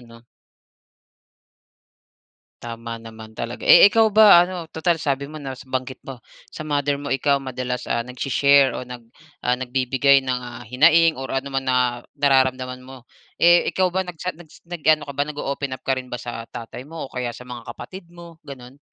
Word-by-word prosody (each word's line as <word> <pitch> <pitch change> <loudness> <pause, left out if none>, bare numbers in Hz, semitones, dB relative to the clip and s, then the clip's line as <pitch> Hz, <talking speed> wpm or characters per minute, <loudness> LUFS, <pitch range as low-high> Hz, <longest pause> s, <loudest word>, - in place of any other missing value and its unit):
'no? 115 0 -17 2.4
Tama 115 0 -7
naman 110 -1 -12
talaga, 120 +1 -5
eh, - - +9
ikaw 220 +2 +5
ba 210 -4 +7
ano, 175 -1 -2
tutal 170 +1 0
sabi 140 -3 -2
mo 155 - -10
na 140 -3 -6
s 130 +1 -12
banggit 130 0 -4
mo 130 -4 -11 0.2
sa 155 - -8
mother 145 -1 0
mo 140 0 -4
ikaw 140 +1 +2
madalas 130 -2 -4
ah, 120 - -1
nag-shi-share 135 +3 +2
o - - -5
nag, 125 -1 -9 0.4
ah, 125 +1 0
nagbibigay 130 +2 +2
ng 125 -1 -2
ah, 120 0 -9
hinaing 155 +5 +4
or 135 - -6
ano 140 +1 -4
man 135 0 -2
na 130 - +2 0.4
nararamdaman 130 -2 +1
mo. 130 -1 -13 0.3
Eh, 175 0 +5
ikaw 185 -1 0
ba 190 - 0
nagchat 180 +1 -5
nag-s 160 -3 -17
nag-ano 155 -3 +1
ka 140 - -8
ba 145 +2 -2
nag-o-open 140 -2 -4
up - - -33
ka 130 -1 0
rin 125 - -13
ba 125 - -5
sa 120 -2 -7
tatay 115 +1 -9
mo 165 0 -7
o 135 - -11
kaya 125 -1 -3
sa 125 - -11
mga 120 -2 -10
kapatid 185 -2 -10
mo 170 -1 -14
ganoon? 135 -2 -12
135 Hz, 185 wpm, -22 LUFS, 125-155 Hz, 2.4 s, eh